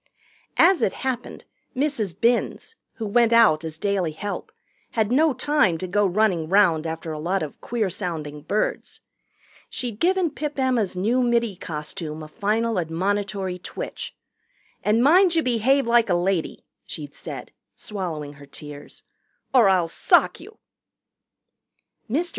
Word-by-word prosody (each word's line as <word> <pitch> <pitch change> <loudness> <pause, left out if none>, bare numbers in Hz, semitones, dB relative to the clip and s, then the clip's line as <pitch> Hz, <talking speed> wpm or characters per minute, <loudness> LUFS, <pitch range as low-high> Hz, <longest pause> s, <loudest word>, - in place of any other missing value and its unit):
As 380 -2 +5
it - - +2
happened, 255 -2 -4 0.3
Mrs. 255 - -1
Binns, 240 - 0 0.2
who 225 - -5
went 230 +2 +3
out 220 -10 +5
as 160 -1 -5
daily 190 -3 -1
help, 205 - -5 0.4
had 220 -1 +1
no 305 +5 +4
time 255 - +2
to 185 - -4
go 205 +2 +2
running 180 -4 +1
round 175 -5 +4
after 160 0 -5
a 155 - -5
lot 180 +4 -1
of 150 - -8
queer 225 -3 -1
sounding 160 -6 -5
birds. 210 +7 -2 0.7
She'd 235 -4 -5
given 360 0 +2
Pip 295 0 -5
Emma's 250 -8 +1
new 225 +8 +1
middy 235 -4 +1
costume 155 -1 -6
a - - -8
final 215 +5 0
admonitory 190 +2 -2
twitch. - - -6 0.7
"And 220 +3 +3
mind 345 +5 +5
you 325 - +3
behave 255 +3 +2
like 235 -2 +3
a 175 - +3
lady," 175 -1 -1 0.2
she'd 145 -2 -7
said, - - -8 0.2
swallowing 165 -9 -5
her 140 - -12
tears, 145 0 -10 0.5
"or 240 -7 +6
I'll 180 -3 +3
sock - - +3
you." 440 - -13 1.5
Mr. 325 +9 0
205 Hz, 140 wpm, -24 LUFS, 170-240 Hz, 1.5 s, or